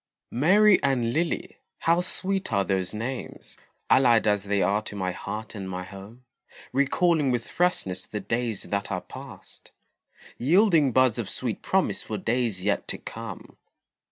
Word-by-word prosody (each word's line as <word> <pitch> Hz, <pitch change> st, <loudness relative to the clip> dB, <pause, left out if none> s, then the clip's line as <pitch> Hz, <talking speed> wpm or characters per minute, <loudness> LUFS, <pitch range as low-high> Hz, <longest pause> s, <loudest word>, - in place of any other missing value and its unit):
Mary 190 Hz, -, +5 dB
and 125 Hz, -4 st, +1 dB
Lily 165 Hz, +2 st, -2 dB, 0.2 s
how 170 Hz, +2 st, +3 dB
sweet 195 Hz, +1 st, -2 dB
are 100 Hz, -, +2 dB
those 95 Hz, -2 st, -1 dB
names, 120 Hz, +4 st, -6 dB, 0.3 s
Allied 120 Hz, -4 st, +5 dB
as 105 Hz, -2 st, +1 dB
they 100 Hz, 0 st, +1 dB
are 105 Hz, +2 st, +2 dB
to 105 Hz, -, -8 dB
my 95 Hz, -2 st, -1 dB
heart 105 Hz, +4 st, -6 dB
and 95 Hz, -3 st, -6 dB
my 90 Hz, 0 st, -4 dB
home; 100 Hz, +6 st, -12 dB, 0.5 s
Recalling 145 Hz, +2 st, +2 dB
with 120 Hz, -2 st, -1 dB
freshness 95 Hz, -, 0 dB
the 105 Hz, -, -4 dB
days 115 Hz, +1 st, -2 dB
that 100 Hz, 0 st, -3 dB
are -, -, -2 dB
past, -, -, -12 dB, 0.7 s
Yielding 165 Hz, -, +4 dB
buds 130 Hz, -1 st, +3 dB
of 105 Hz, -5 st, -3 dB
sweet -, -, -3 dB
promise -, -, +1 dB
for -, -, -5 dB
days 115 Hz, -6 st, -1 dB
yet 105 Hz, -, 0 dB
to -, -, -2 dB
come. 115 Hz, -4 st, -9 dB
115 Hz, 155 wpm, -26 LUFS, 100-140 Hz, 0.7 s, Mary